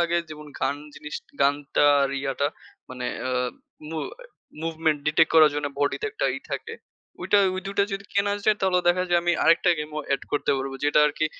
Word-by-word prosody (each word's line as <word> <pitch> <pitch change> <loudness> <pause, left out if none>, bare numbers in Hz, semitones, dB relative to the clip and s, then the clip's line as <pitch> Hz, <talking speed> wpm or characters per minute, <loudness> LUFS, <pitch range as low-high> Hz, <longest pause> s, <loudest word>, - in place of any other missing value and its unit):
লাগে 170 0 +2
যেমন 150 0 -9
গান 140 - 0 0.2
জিনিস 150 0 -8 0.3
গানটা 145 +1 +2 0.2
আর 135 - +1
ইয়াটা 135 +1 -1 0.4
মানে। 125 -1 -5 0.2
আ - - -1 0.6
মু 160 - -3 0.6
মুভমেন্ট 160 -2 0
ডিটেক্ট 155 +1 +4
করার 155 -2 +8
জন্য 145 0 -1
বডিতে 145 - 0
একটা 435 - -1
ই - - -4
থাকে। 460 - -4 0.5
ঐটা 205 - +3 0.2
ওই 185 - -3
২ 195 - -4
টা 200 - +5
যদি 195 0 -4
কেনা 200 0 +2
যায় 215 -1 +4
তাহলে 190 -1 +2
দেখা 180 +1 +3
যায় 175 0 +3
আমি 175 0 +2
আরেকটা 170 +2 +5
গেমও 150 0 -4
এড 135 - -6
করতে 145 - +1
পারব। 135 0 -3
যেটা 145 +1 +3
আরকি 150 +1 0
155 Hz, 190 wpm, -25 LUFS, 145-175 Hz, 0.6 s, করার